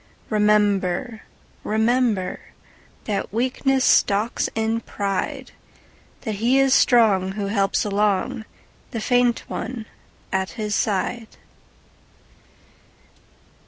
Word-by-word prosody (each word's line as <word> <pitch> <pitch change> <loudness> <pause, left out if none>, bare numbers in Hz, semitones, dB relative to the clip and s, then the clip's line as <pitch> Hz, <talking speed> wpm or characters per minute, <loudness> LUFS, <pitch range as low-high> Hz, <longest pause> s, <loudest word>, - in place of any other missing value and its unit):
Remember, 210 0 +1 0.4
rememberThat 220 -2 -2
weakness 260 +3 0
stalks 210 +4 +2
in 225 +1 0
pride; 200 -3 -4 0.7
That 220 -4 -4
he 245 +4 +3
is 270 -1 +4
strong 200 -8 +4
who 205 0 -3
helps 200 -1 +1
alongThe 205 +1 0 0.6
faint 245 +1 +2
one 240 -4 -5 0.5
at 190 0 -1
his 210 -1 -2
side. 220 +3 -1
215 Hz, 80 wpm, -22 LUFS, 200-235 Hz, 0.7 s, is